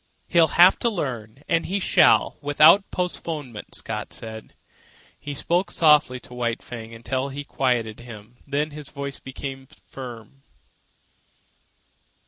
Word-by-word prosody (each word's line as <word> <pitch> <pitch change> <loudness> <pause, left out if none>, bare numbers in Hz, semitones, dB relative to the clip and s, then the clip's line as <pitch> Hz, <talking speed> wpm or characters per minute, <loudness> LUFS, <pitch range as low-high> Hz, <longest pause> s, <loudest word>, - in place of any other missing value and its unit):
"He'll 170 -2 +5
have 180 +2 +7
to 235 - +1
learn, 130 - -5
and 165 - +1
he 195 +3 -1
shall, - - +4
without 155 +7 +5
postponement," 155 - -4
Scott - - -5
said. 110 -1 -8 0.6
He 145 -1 -6
spoke 175 +6 0
softly 150 -5 +4
to - - -13
White 120 -2 -2
Fang 115 -2 -8
until 130 +4 -3
he 140 +1 -6
had 145 - -13
quieted 120 -5 -1
him, 115 0 -12
then 145 +2 -1
his 150 -1 -10
voice 140 -1 -6
became 135 0 -7
firm. 125 -1 -11
135 Hz, 130 wpm, -24 LUFS, 120-150 Hz, 0.6 s, have